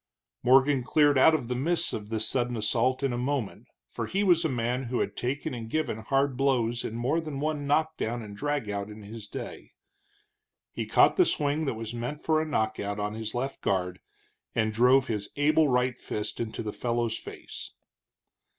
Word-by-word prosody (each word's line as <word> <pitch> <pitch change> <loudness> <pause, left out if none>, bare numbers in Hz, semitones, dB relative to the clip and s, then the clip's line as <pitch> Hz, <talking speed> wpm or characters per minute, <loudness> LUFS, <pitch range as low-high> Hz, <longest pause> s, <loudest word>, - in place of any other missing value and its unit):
Morgan 135 +2 +5
cleared 145 +1 +4
out 160 +4 +7
of 135 -6 -3
the 125 - -1
mists 160 +8 0
of 105 -1 -5
this 110 -1 -1
sudden 120 -2 0
assault 125 +5 +1
in 135 -3 +1
a 120 - -2
moment, 130 -4 -2 0.2
for - - -4
he 200 +2 0
was 175 -4 +4
a 160 - +1
man 125 +1 -1
who 120 +1 -2
had - - -1
taken 130 +3 -2
and 115 -2 -6
given 150 -6 -1
hard 135 +4 +1
blows 125 -3 +1
in 110 - -4
more 135 +8 0
than 155 -4 -5
one 150 -1 -2
knock 155 +2 +1
down 120 +1 -2
and 100 -1 -9
drag 145 0 -2
out 100 0 -3
in 105 0 -10
his 105 +1 -9
day. - - -8 1.0
He - - -4
caught - - +5
the - - +7
swing 145 +2 +1
that 135 - -1
was 115 0 -5
meant 120 +5 -4
for 155 0 +2
a 160 - -3
knock 110 -8 0
out 100 +1 -3
on 105 0 -2
his 110 0 -5
left 135 +3 -3
guard, 90 -1 -1 0.6
and 110 -1 +1
drove 125 +4 +5
his 105 -4 -3
able 155 +2 +4
right 125 -1 +1
fist 105 0 -4
into 115 0 -3
the 105 - -4
fellow's 120 -2 -1
face. - - -9
125 Hz, 200 wpm, -28 LUFS, 110-145 Hz, 1.0 s, out